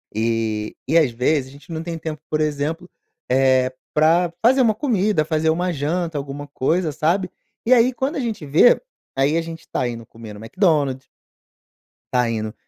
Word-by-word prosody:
eh, 110 -1 -1
e 160 - +3
às 155 -6 +4
vezes 130 +3 0
a - - -15
gente 140 +3 -15
não 160 0 -3
tem 165 0 -5
tempo, 155 -2 -6
por 155 0 0
exemplo, 155 +4 -2 0.4
eh, 130 0 +3 0.2
para 165 +3 +3
fazer 260 +3 +5
uma 225 -4 +3
comida, 210 - +1
fazer 160 0 +1
uma 175 +3 +1
janta, 160 +2 -2
alguma 140 +1 -6
coisa, 155 +4 0
sabe? 175 +6 0 0.4
E 255 - +5
aí 245 +1 +5
quando 265 +5 -2
a - - -1
gente 220 - -3
vê, 155 - +5 0.4
aí, 135 +3 +2
a - - +1
gente 165 0 -9
tá 125 - -1
indo 115 -1 -6
comer 115 -1 -11
no 105 - -11
McDonald's 140 - 0 1.1
tá 125 -2 +2
indo, 110 -1 -3
155 Hz, 180 wpm, -21 LUFS, 130-175 Hz, 1.1 s, fazer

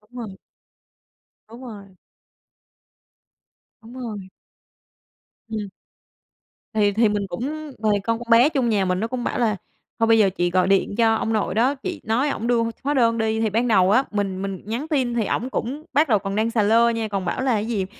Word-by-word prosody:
Đúng 210 - -31
rồi. 215 -5 -7 1.1
Đúng 235 +3 -12
rồi. 200 -5 -11 1.9
Đúng 230 +2 -13
rồi. 215 -7 -7 1.2
Ừm. 220 -1 -3 1.2
Thì 210 -2 +3
thì 220 +2 +3
mình 205 -1 -1
cũng 290 - -5
thì 210 -1 +2
con 230 +1 -1
con 240 -1 -10
bé 235 +5 +6
chung 270 -6 0
nhà 205 -3 +1
mình 180 0 0
nó 225 - -1
cũng 250 0 -4
bảo - - -2
là 225 -3 +2 0.4
"Thôi 225 - +3
bây 225 0 +5
giờ 200 -3 +5
chị 175 -1 -1
gọi 185 +1 +2
điện 195 +1 +2
cho 225 -1 +4
ông 225 0 -1
nội 210 -3 -1
đó, 250 +6 +2
chị 330 +5 -6
nói 240 +7 +1
ổng 235 -4 -3
đưa 240 -1 +2
h 230 - -1
hóa 285 +2 0
đơn 230 -4 +2
đi." 220 0 0
Thì 220 - +1
ban 230 +4 0
đầu 190 -4 +4
á, 255 +5 +4
mình 195 -3 -2
mình 195 -2 -4
nhắn 235 +8 -4
tin 265 -6 0
thì 230 -3 0
ổng 245 +5 -2
cũng 265 +4 -4
bắt 300 +1 +3
đầu 215 -3 +4
còn 195 0 -4
đang 220 +2 0
xà 225 -2 +1
lơ 230 +3 +4
nha, 225 -1 -2
còn 195 -3 -3
bảo 175 - -2
là, 260 -2 +1
cái 210 -1 0
gì? 210 -5 -1
225 Hz, 210 wpm, -22 LUFS, 205-240 Hz, 1.9 s, bé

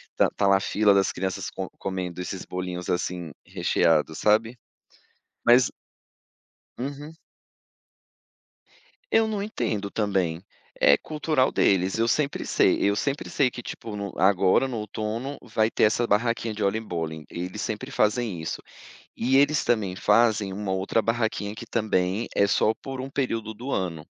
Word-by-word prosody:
tá - - +4
tá 100 - +2
lá 100 0 +6
a - - -2
fila 105 +1 +2
das 100 0 +3
crianças 95 0 -3
co - - -5
comendo 90 -2 -4
esses 90 +1 -5
bolinhos, 90 -1 -5
assim, 90 -2 -2
recheados, 80 -1 +1
sabe? 110 +5 +2 0.9
Mas 125 +1 +6 1.1
Uhum. 145 +4 -6 2.0
Eu 225 - +4
não 215 -2 -2
entendo 115 - -2
também. 95 -6 -1 0.4
É 70 - +6
cultural 150 -3 0
deles, 95 0 +2
eu 115 +1 +2
sempre 140 +4 0
sei - - +3
eu 100 0 +3
sempre 140 +6 -2
sei 135 -3 +3
que 120 0 -9
tipo 110 -2 -7
no 100 -1 -5
agora 95 +6 +3
no 125 -3 -4
outono 110 +5 -4
vai 110 -1 0
ter - - +1
essa 115 +3 +2
barraquinha 115 +1 0
de 105 0 -3
Oliebollen, 85 -7 -2
eles 90 +4 -5
sempre 110 +5 -4
fazem 110 -6 0
isso. 80 - -4 0.6
E 130 +3 +2
eles 145 +2 +4
também 105 -6 +1
fazem 105 -1 +3
uma 100 0 -3
outra 95 +4 0
barraquinha 110 -3 -1
que - - -9
também 105 -1 0
é 100 - +4
só 105 +2 +3
por 135 +2 -7
um 135 +1 -6
período 115 -6 -2
do 120 +6 -7
ano, 85 -5 -2
105 Hz, 150 wpm, -25 LUFS, 95-120 Hz, 2.0 s, lá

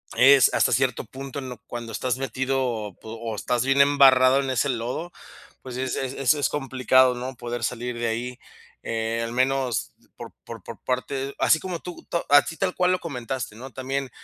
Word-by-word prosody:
es, 135 0 +6
hasta - - +3
cierto 130 -3 +1
punto, 135 +3 -7
en 130 -2 -6
lo 125 - -7
cuando 120 -1 -6
estás 125 +2 -1
metido 130 -6 -2
po 110 - -8
o 115 -1 -5
estás 120 +3 -1
bien 135 +1 +4
embarrado 135 -2 +6
en 135 -1 -2
ese 130 +2 +1
lodo, 130 +8 -3 0.5
pues, 130 -2 -8
sí 130 - -3
es 130 - -2
es 130 -1 -3
es 135 +1 +3
es 145 - 0
complicado, 130 -2 +3
¿no?, 125 +1 -5
poder 120 0 -5
salir 120 +1 -3
de 120 0 -1
ahí, 120 +2 -4 0.4
eh, 115 0 -2
al 115 - -4
menos 130 -1 0 0.2
por - - -9
por - - -9
por - - -9
parte 135 +2 -2
así 160 - +4
como 180 -1 -5
tú 180 -1 -9
to 170 - -1
así 145 +3 +4
tal 190 -2 -1
cual 180 0 +2
lo 185 - +1
comentaste, 125 -7 -5
¿no? 130 +4 -9
También 135 +2 -3
130 Hz, 200 wpm, -24 LUFS, 120-135 Hz, 0.5 s, es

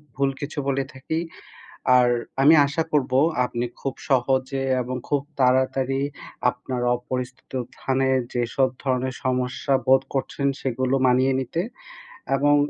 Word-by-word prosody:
ভুল 140 0 +2
কিছু 145 +2 -6
বলে 135 0 +1
থাকি। 140 +4 -3 0.8
আর 125 -1 +5 0.3
আমি 145 +4 +7
আশা 155 +3 -1
করব 135 -4 +1 0.3
আপনি 120 0 -2
খুব 135 - -3 0.2
সহজে 130 +1 +1 0.2
এবং 125 +1 -4
খুব 145 -2 +1 0.2
তাড়াতাড়ি 130 +1 +2 0.5
আপনার 125 0 -5 0.2
অপরিচিত 125 +1 -6 0.3
স্থানে 135 0 +1 0.2
যেসব 120 +2 +1 0.2
ধরনের 130 -1 -1
সমস্যা 130 +1 0
বোধ 130 0 +6
করছেন, 140 +1 -1
সেগুলো 130 +1 0
মানিয়ে 130 +1 +3
নিতে। 135 +6 -2 0.7
এবং 145 +1 +4
130 Hz, 125 wpm, -24 LUFS, 125-135 Hz, 0.8 s, আমি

